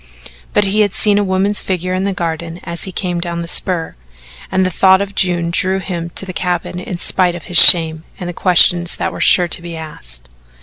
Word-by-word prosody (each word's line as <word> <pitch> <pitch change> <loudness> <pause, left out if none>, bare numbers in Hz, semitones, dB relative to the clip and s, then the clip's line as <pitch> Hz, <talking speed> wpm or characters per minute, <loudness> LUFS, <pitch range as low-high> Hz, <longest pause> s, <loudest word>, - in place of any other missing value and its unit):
But - - +3
he 200 +2 -1
had 205 -3 +1
seen 205 -1 +3
a - - 0
woman's 195 +2 +1
figure 185 -1 -3
in 185 +1 -2
the 200 - -1
garden 170 -1 -5
as 170 0 -5
he 190 - -7
came 180 -2 -4
down 170 -1 -5
the - - -9
spur, 170 -1 -3 0.6
and 190 0 +1
the 185 - -2
thought 190 +2 +3
of 200 0 -5
June 175 -3 0
drew 185 +2 +1
him 175 -3 -6
to - - +2
the 185 - -8
cabin 180 0 -4
in 180 0 -7
spite 180 0 +1
of 175 - -9
his 175 - +4
shame 160 -2 +7 0.2
and 180 - -6
the 175 - -6
questions 175 -1 +3
that - - -4
were - - -8
sure 180 -1 +3
to 170 - -1
be 170 -1 -8
asked. 60 - -6
180 Hz, 225 wpm, -15 LUFS, 170-190 Hz, 0.6 s, shame